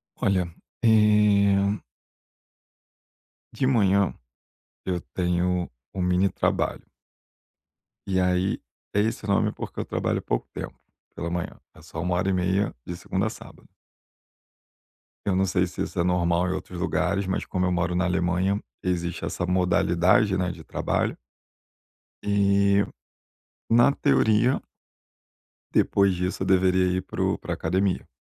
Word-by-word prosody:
Olha, 90 -4 0 0.3
eh 105 -2 +4 1.7
de 130 - -1
manhã 100 -7 +3 0.7
eu 90 -2 -1
tenho 90 0 0 0.2
um 95 - -3
mini 90 +2 +2
trabalho. - - -1 1.3
E 95 -1 +1
aí, 90 +1 +1 0.3
é 105 - +2
esse 110 +1 -2
nome, 100 0 +2
porque - - -7
eu - - -2
trabalho - - -1
pouco - - -2
tempo - - -7 0.4
pela 85 - -4
manhã, 85 0 -4
é 80 - -16
só 80 0 -7
1 90 0 0
hora 90 +2 0
e - - +2
meia 95 +2 +1
de 90 - -5
segunda 95 +3 -2
a - - -1
sábado. 110 - -13 1.6
Eu 100 - +1
não 95 +1 +2
sei 90 -1 +1
se 90 - -7
isso - - -3
é - - +3
normal 90 0 +1
em - - 0
outros 90 -1 -6
lugares, 100 +1 0
mas 95 - -2
como 90 0 -1
eu 90 - +1
moro 90 0 0
na 90 - +1
Alemanha, 90 +3 +1 0.2
existe 90 -2 -2
essa 90 - -2
modalidade, 90 +2 +3
né, 90 -1 0
de 85 -2 -11
trabalho. - - -1 1.0
E, 100 0 +3 0.9
na 120 +4 +5
teoria 120 -4 +2 1.1
depois 100 -1 +3
disso 90 +1 -3
eu - - -3
deveria 95 -1 +3
ir 95 - -1
para - - -5
o - - +1
pra - - -5
academia, 95 +3 -1
95 Hz, 140 wpm, -25 LUFS, 90-100 Hz, 1.7 s, na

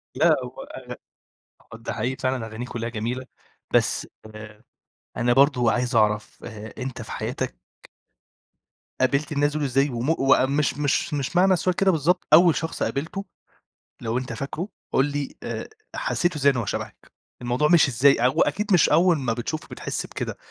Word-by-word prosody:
لا - - +4
هو - - -8
أغ - - -9 0.8
ده 115 - -5
حقيقي 130 +2 -2
فعلًا 130 -3 -2
أغانيه 115 +3 -6
كلّها 115 -1 -4
جميلة، 120 +3 -4 0.5
بس - - +2 0.3
آآ، 105 +1 -11 0.5
أنا 120 0 +2
برضه 130 -3 +4
عايز 125 0 0
أعرَف 105 0 +1
آآ، 110 -1 -8
أنت 130 0 -5
في - - -8
حياتك - - -4 1.5
قابِلت 140 +4 +1
الناس 145 0 +1
دول 155 -1 -2
إزاي 135 +2 +2
وم 125 +7 0 0.4
مش 150 - +2
أ - - -14
مش 150 +3 0
مش 145 +4 -2
معنى 190 +1 +5
السؤال 180 +1 +1
كده 195 -1 +3
بالضبط، 170 +3 +1
أول 170 0 +7
شخص 160 - -3
قابِلته 165 +8 -3 0.8
لو 115 +1 -1
أنت 130 -2 -4
فاكره 145 - -4 0.2
قُل 135 - +3
لي 145 -1 -4
آآ - - -5 0.3
حسّيت 180 - 0
إزاي 140 -1 +4
إن 130 - -4
هو 115 - -1
شبَهك؟ - - -6 0.3
الموضوع 125 +5 +1
مشي 165 -6 +5
إزاي؟ 135 +4 +5
هو 125 +1 +3
أكيد 200 +7 +1
مش 175 - +5
أول 175 -1 +4
ما 125 -5 -1
بتشوفه 125 +7 -4
بتحس - - -4
بكده، - - -5
135 Hz, 165 wpm, -24 LUFS, 120-155 Hz, 1.5 s, أول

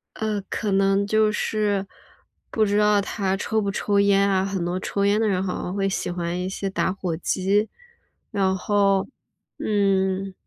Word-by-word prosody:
呃， 215 -2 -2
可 210 -3 -2
能 195 +1 +2
就 215 0 +3
是 210 -2 0 0.6
不 220 - +1
知 205 0 +1
道 210 -1 +4
他 195 -1 -1
抽 220 +2 -1
不 200 -1 -1
抽 200 0 0
烟 200 0 +4
啊， 190 -1 +2
很 195 -2 -2
多 175 +1 -2
抽 200 +1 -1
烟 205 +1 +3
的 225 - +2
人 185 -3 +1
好 185 -2 -3
像 180 - -4
会 195 0 0
喜 190 -2 -2
欢 175 0 -3
一 180 +1 -2
些 195 +1 -3
打 190 - 0
火 185 -3 -3
机。 195 +5 0 0.6
然 190 -1 +1
后， 195 0 +2 0.5
嗯， 195 -2 +1
195 Hz, 190 characters per minute, -23 LUFS, 190-205 Hz, 0.6 s, 道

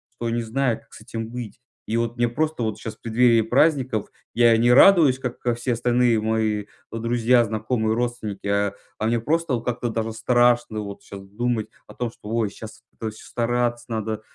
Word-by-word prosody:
что 115 -1 -3
не 120 0 -1
знаю 120 0 0
как - - -25
с - - -12
этим 115 -1 -6
быть 120 -1 -7 0.3
и 115 - 0
вот 115 0 -1
мне 120 -1 +1
просто 155 0 -1
вот 110 -1 -2
сейчас 110 0 -7
в - - -39
преддверие 115 0 +3
праздников 130 -3 +1 0.2
я 120 -1 +5
не 120 +2 +3
радуюсь 145 -3 +6
как, 125 -1 -6
а, 120 - +2
все 120 +1 -1
остальные 120 -1 +2
мои 110 -2 0 0.3
друзья, 120 +1 +2
знакомые, 110 +1 -1
родственники, 120 -5 -3
а, 100 0 +1 0.3
а 110 - 0
мне 115 0 +1
просто 150 -1 0
как-то 120 0 -3
даже 115 0 -3
страшно 120 -1 +2
вот 100 -1 -8
щас 100 - -9
думать 115 +1 -2 0.2
о 105 - -12
том, 120 -1 -2
что- 105 - -12
ой, 115 -2 0
щас 110 +2 -11
это 110 - -5
все 110 - -14
стараться 120 0 -1
надо 110 -1 -3
115 Hz, 190 wpm, -23 LUFS, 110-120 Hz, 0.3 s, радуюсь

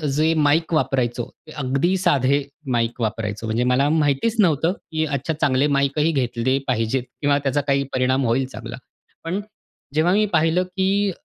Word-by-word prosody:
जे 155 +2 +3
माईक 155 +3 +2
वापरायचो 125 -5 0 0.2
ते - - -11
अगदी 140 +7 +1
साधे 140 -4 +2 0.3
माईक 120 0 -1
वापरायचो. 110 0 -3
म्हणजे 115 +3 0
मला 125 +3 +2
माहितीच 155 +8 +1
नव्हतं, 165 0 +2 0.2
की 155 0 0
अच्छा 145 +2 -2
चांगले 135 +1 +3
माईकही 140 +3 +1
घेतले 130 -1 0
पाहिजेत 120 +1 0 0.2
किंवा 145 -1 +3
त्याचा 140 +1 0
काही 140 0 +2
परिणाम 130 +1 +1
होईल 120 +3 +1
चांगला. - - -7 0.5
पण 180 +5 -2 0.5
जेव्हा 170 +4 +3
मी 215 +2 +3
पहिलं, 165 +3 +3
की 190 +2 0
140 Hz, 155 wpm, -22 LUFS, 130-160 Hz, 0.5 s, जे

